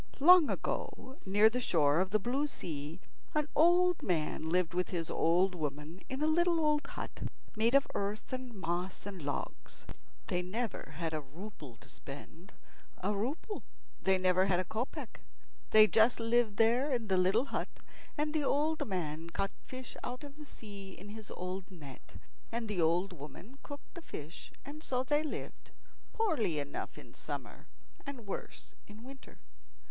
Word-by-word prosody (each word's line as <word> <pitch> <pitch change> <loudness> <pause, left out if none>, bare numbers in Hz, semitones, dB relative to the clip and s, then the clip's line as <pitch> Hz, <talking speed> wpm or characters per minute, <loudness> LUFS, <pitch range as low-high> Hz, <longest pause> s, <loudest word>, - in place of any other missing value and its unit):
Long 345 +2 +8
ago, 260 +2 -3
near 205 +3 +6
the 240 +3 +1
shore 155 -9 +3
of 185 0 +2
the 215 - +4
blue 255 +8 0
sea, 155 - -5 0.4
an 300 -1 +2
old 350 +2 +5
man 160 -2 0
lived 180 0 +2
with 180 +1 0
his 170 -3 -2
old 180 +3 +3
woman 150 +2 -4
in 265 +3 -2
a - - +4
little 340 +2 +4
old 300 -1 +2
hut - - -6 0.4
made 230 +4 +3
of 275 - +6
earth 205 +5 -2
and 255 -1 -4
moss 185 -3 -3
and 195 -3 -6
logs. 145 0 -5 0.4
They 180 - 0
never 205 -2 -3
had 165 -1 -2
a 155 - -1
rouble 150 - -10
to - - -16
spend. 160 +7 -10 0.5
A 205 +3 +2
rouble! 280 - -2 0.4
they 190 0 +4
never 185 +1 +3
had 180 -2 +3
a - - +1
kopeck. 225 +7 -4 0.5
They 215 0 +9
just 225 +3 +4
lived 230 -2 +2
there 240 +6 +4
in 235 -4 0
the 190 - +3
little 190 +7 +4
hut, - - -2 0.5
and 300 +1 0
the 310 -2 +1
old 300 +3 +1
man 165 -4 -3
caught 195 +3 -1 0.2
fish 255 -1 -7
out 250 +3 -4
of 285 -1 -9
the 300 0 -10
sea 200 -7 -9
in 200 +3 -10
his 215 -1 -8
old 180 +1 -5
net, 150 -8 -12 0.4
and 230 0 -2
the 205 -5 0
old 175 +4 +2
woman 175 - -10
cooked 285 0 -10
the 345 - -8
fish; 155 - -8
and 295 +2 -8
so 255 -4 0
they 295 +3 +2
lived, 310 - -6 0.4
poorly 265 - +1
enough 145 -1 -4
in - - -12
summer - - -7 0.4
and 275 -6 -7
worse 195 - -6
in 210 +2 -12
winter. 270 +1 -12
210 Hz, 170 wpm, -33 LUFS, 180-265 Hz, 0.5 s, They